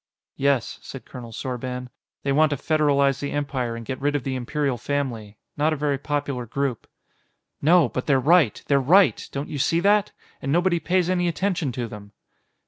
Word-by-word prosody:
"Yes," 140 -3 +1
said 135 - -9
Colonel 120 -3 -9
Sorban. 125 +1 -5 0.3
"They 140 - 0
want 155 +2 +4
to 145 - 0
federalize 140 -2 +2
the 140 - -3
Empire 135 -5 -2
and 115 0 -7
get 130 +2 -5
rid 145 +1 +1
of 145 - -1
the 135 - -2
Imperial 130 0 -1
Family. 120 -8 -3 0.2
Not 155 +2 +2
a - - 0
very 145 -2 -1
popular 140 -4 -3
group." 135 -1 -2 0.7
"No, 165 0 +5
but 130 +2 -4
they're 135 -3 +4
right! 150 - +3
They're 140 -1 +3
right! 185 +8 +4
Don't 140 +2 -4
you 145 - -5
see 165 +5 +2
that? 205 +2 +3 0.3
And 135 - -2
nobody 175 +2 +2
pays 180 +1 +1
any 180 -1 +1
attention 175 -4 -1
to 120 -1 -3
them!" 105 -1 -11
140 Hz, 185 wpm, -24 LUFS, 125-155 Hz, 0.7 s, No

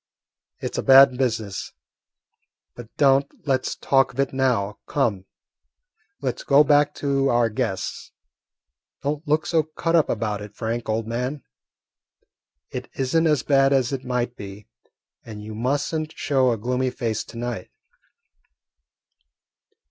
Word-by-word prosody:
"It - - -4
's - - -4
a - - +1
bad 135 -1 +7
business, 115 -6 -2 1.0
but 120 -2 -11
don't 140 -1 +4 0.2
let 130 -2 +1
's - - -3
talk 135 -1 +2
of 130 - -11
it 140 -1 0
now. 120 -7 0
Come, 110 -10 0 1.0
let - - -2
's - - -8
go 140 +2 +5
back 145 0 +3
to 140 -1 0
our 120 -1 +2
guests. 95 -3 -3 0.9
Don't 150 +2 -3
look 150 +2 +2
so 165 -2 +2
cut 165 +2 -2
up 160 - +3
about 105 -2 -2
it, 105 0 -10
Frank, 115 0 -3
old 110 +1 0
man. 125 +5 -3 1.3
It - - -6
is 130 +3 -2
n't 165 0 +4
as 150 -4 +2
bad 135 -1 +3
as 130 -1 +1
it 135 -1 -3
might 125 -1 -2
be, 100 +1 -9 0.6
and 105 -2 -9
you 110 +1 -7
must 130 +8 -1
n't 155 -1 -2
show 135 -3 +2
a 115 - -1
gloomy 125 +4 -1
face 115 -3 -3
to - - -11
night." 120 -1 -4
130 Hz, 150 wpm, -23 LUFS, 115-140 Hz, 1.3 s, bad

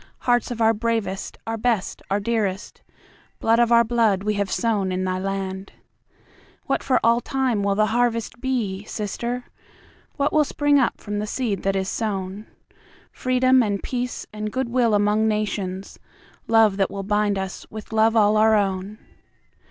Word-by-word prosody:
Hearts 245 -2 +1
of 235 -2 -4
our 225 0 +5
bravest, 220 -4 -2
our 225 0 -3
best, 225 -4 -1
and - - -23
our 200 - +1
dearest, 205 -3 -2 0.6
Blood 230 +1 +3
of 240 0 +3
our 235 0 +6
blood 220 -4 +1
we 210 +1 0
have 200 -1 -1
sown 205 -5 0
in 185 0 -1
thy 185 0 -1
land. 195 0 -4 0.9
What - - 0
for 260 - +2
all 230 +1 +4
time 260 -6 0
will 200 0 +1
the 215 +1 +3
harvest 235 -1 0
be, 225 -7 -2
Sister? 235 +4 -4 0.7
What 285 0 0
will 305 - +5
spring 290 0 +2
up 250 - 0
from 205 -1 -4
the 210 - -3
seed 215 -3 -2
that 195 0 0
is 190 -1 -1
sown? 200 -1 -3 0.6
Freedom 255 0 +3
and 205 -4 -1
peace 250 -1 -3
and 215 0 -4
goodwill 240 -3 +1
among 210 +1 +2
Nations, 200 -3 -3 0.5
Love 220 -3 +4
that 195 - +1
will 195 0 -5
bind 205 0 +1
us 190 0 -5
with 215 0 -9
love 220 +1 +3
all 215 -1 +4
our 220 0 +5
own. 195 0 -1
215 Hz, 165 wpm, -23 LUFS, 200-235 Hz, 0.9 s, our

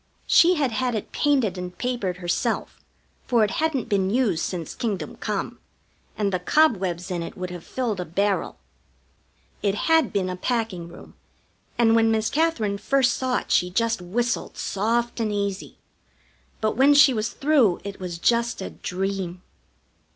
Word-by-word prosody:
She 355 +2 +5
had 280 -6 0
had 250 +1 -1
it 215 - -5
painted 255 -11 +1
and 180 0 -7
papered 235 -8 -2
herself, 175 -1 -2 0.4
for 235 -3 +3
it 205 - +1
hadn't 315 -6 0
been 195 -2 +1
used 210 -7 +1
since 170 -4 -4
kingdom 210 -6 -3
come, - - -3 0.6
and 200 -2 0
the 185 - +1
cobwebs 185 - +1
in 175 -1 -2
it 165 - -7
would 180 -1 -5
have 175 -2 -8
filled 235 -7 -3
a 180 - -3
barrel. 200 +5 -1 1.0
It 200 -1 +1
had 320 +4 +2
been 195 -3 0
a 185 - -3
packing 215 -4 -2
room, 170 - -13 0.6
and 230 -1 +4
when 225 0 +4
Miss 220 0 +1
Katherine 250 -11 0
first 260 +4 +2
saw 255 -1 0
it - - -10
she 180 - +3
just 230 +2 0
whistled 230 +7 -2
soft 235 +4 -1
and 220 -2 0
easy; 200 -1 -3 0.8
but 215 -1 0
when 275 +4 +5
she 285 -2 +7
was 220 -1 -1
through, 275 - +2
it 200 -1 -7
was 180 -2 -5
just 235 +5 +1
a 190 - -5
dream. 185 -1 -4
215 Hz, 165 wpm, -24 LUFS, 185-245 Hz, 1.0 s, she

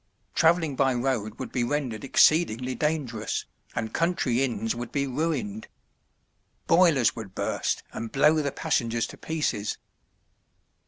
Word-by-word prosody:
Traveling 165 -3 +3
by 135 -1 +2
road 120 -4 -1
would 130 - -6
be 125 - 0
rendered 125 -4 -2
exceedingly 130 -4 +3
dangerous, 135 -8 -2 0.3
and 110 -1 -3
country 165 -8 +1
inns 115 -4 -1
would 120 0 -6
be 140 -1 0
ruined. 130 -7 -2 1.0
Boilers 165 -8 +4
would 105 -4 -8
burst - - -1
and 115 0 -5
blow 150 +3 +5
the 140 -1 -1
passengers 115 -4 0
to - - -10
pieces. 150 -10 -2
130 Hz, 125 wpm, -26 LUFS, 115-150 Hz, 1.0 s, blow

